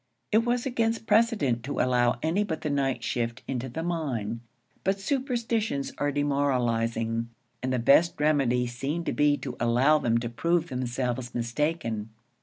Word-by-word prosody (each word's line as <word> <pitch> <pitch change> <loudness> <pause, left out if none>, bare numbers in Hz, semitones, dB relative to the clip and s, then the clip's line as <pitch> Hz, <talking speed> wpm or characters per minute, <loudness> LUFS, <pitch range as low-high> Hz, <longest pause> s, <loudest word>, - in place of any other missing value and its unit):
It 220 - +5
was 240 0 0
against 230 -3 0
precedent 210 - +2
to 145 - -3
allow 125 -1 +2
any 170 +6 +2
but 160 -6 -4
the 150 - -2
night 135 -4 0
shift 115 -1 -2
into 130 -1 -3
the 160 +7 -4
mine; 125 -10 -2 0.4
but 195 +1 +1
superstitions 230 - -1
are 145 0 +1
demoralizing, 115 -5 0 0.3
and 130 - -1
the 130 - +1
best 140 +9 +4
remedy 135 -5 +2
seemed 135 +8 -3
to - - -1
be 145 0 +3
to 130 -3 -6
allow 125 +6 +4
them 115 -4 +2
to 120 0 -2
prove 170 +8 0
themselves 125 -1 -3
mistaken. 115 -3 -2
140 Hz, 155 wpm, -27 LUFS, 120-170 Hz, 0.4 s, It